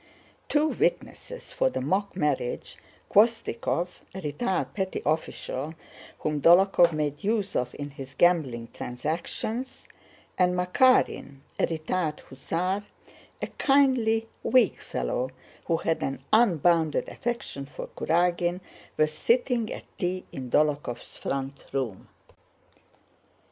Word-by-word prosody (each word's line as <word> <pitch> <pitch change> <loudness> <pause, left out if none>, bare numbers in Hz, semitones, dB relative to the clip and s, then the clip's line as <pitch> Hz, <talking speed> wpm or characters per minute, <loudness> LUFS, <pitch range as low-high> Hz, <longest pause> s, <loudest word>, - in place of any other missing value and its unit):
Two 300 +1 +3
witnesses - - -2
for - - +2
the - - -3
mock 200 +1 -1
marriage—Khvóstikov, 170 - 0 0.3
a 190 - -5
retired 185 - -1
petty 190 -2 -2
official 155 -1 -2 0.5
whom 150 -1 -1
Dólokhov 175 0 +6
made 150 -2 -2
use 205 -2 0
of 125 0 -1
in 145 0 -5
his 135 -1 -9
gambling 135 -9 +2
transactions, 170 - -4 0.5
and 180 0 +4
Makárin, 180 - +3 0.2
a - - +3
retired 160 0 -2
hussar, 180 +9 -2 0.6
a - - 0
kindly, 255 -6 +3
weak 250 -7 +3
fellow 65 - -2 0.4
who 165 - +2
had 165 0 -1
an 135 - -3
unbounded 170 - +4
affection 235 - -4
for - - -7
Kurágin—were 175 -1 0
sitting 230 - +1
at - - -6 0.2
tea 185 0 -1
in 130 -2 -6
Dólokhov's 145 -3 0
front 135 0 -4
room. 125 -8 -3
170 Hz, 105 wpm, -27 LUFS, 145-205 Hz, 0.6 s, Dólokhov